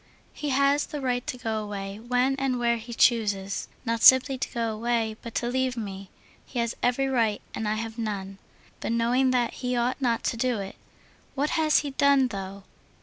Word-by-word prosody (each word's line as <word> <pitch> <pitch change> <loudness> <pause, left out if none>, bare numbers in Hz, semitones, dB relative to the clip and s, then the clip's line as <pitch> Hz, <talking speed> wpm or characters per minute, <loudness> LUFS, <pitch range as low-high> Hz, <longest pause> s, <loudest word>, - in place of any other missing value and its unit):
"He 295 - -4
has 280 +2 +2
the 295 - -5
right 250 -2 -1
to 250 - -3
go 220 -3 -2
away 200 -1 -6
when 250 +3 +1
and 270 -2 0
where 235 -1 +1
he 230 +1 -9
chooses. 205 -5 +1 0.2
Not 230 -1 -1
simply 260 +1 +7
to 260 - -3
go 230 -2 -1
away, 225 0 -1
but 230 - -9
to 240 - 0
leave 255 0 0
me. 195 -3 -6 0.3
He 255 - -9
has 235 -1 0
every 250 +2 +2
right, 230 -5 +1
and 220 - -3
I 210 - +1
have 225 +1 -5
none. 195 -3 -4 0.4
But - - -2
knowing 245 +3 +2
that, 245 -2 +1
he 250 -1 -1
ought 245 +3 0
not 235 -3 +1
to 230 - -1
do 245 0 0
it. 195 -1 -6 0.6
What 290 +2 0
has 310 -1 +3
he 290 -1 -5
done, 275 -1 +3
though?... 195 -2 -6
235 Hz, 200 wpm, -26 LUFS, 220-260 Hz, 0.6 s, simply